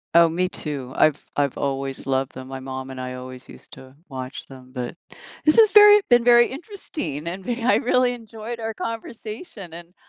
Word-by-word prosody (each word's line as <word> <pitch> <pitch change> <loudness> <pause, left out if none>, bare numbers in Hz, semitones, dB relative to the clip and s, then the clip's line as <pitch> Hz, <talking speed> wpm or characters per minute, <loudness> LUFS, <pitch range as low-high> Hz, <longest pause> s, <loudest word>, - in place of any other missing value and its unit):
Oh, 170 0 +8
me 180 +3 -1
too. 140 -7 -5
I've 155 -2 +3
I've 140 -2 0
always 135 -1 -3
loved 135 0 0
them, 130 0 -9
my 135 0 -6
mom 130 0 -6
and 130 -1 -8
I 125 0 -5
always 125 0 -9
used - - -13
to 130 +1 -13
watch 130 -2 -7
them, 130 -1 -14
but 125 +4 -5 0.5
This 305 - +5
has 435 -2 +7
very 420 -1 +9
been 240 -1 +5
very 240 0 +6
interesting, 270 - -6
and 185 +2 -5
ve 240 -1 -3
I 250 - +4
really 250 0 +2
enjoyed 225 0 -8
our 225 0 -3
conversation, 220 - -7
and 170 +1 -11
170 Hz, 190 wpm, -23 LUFS, -, 0.5 s, very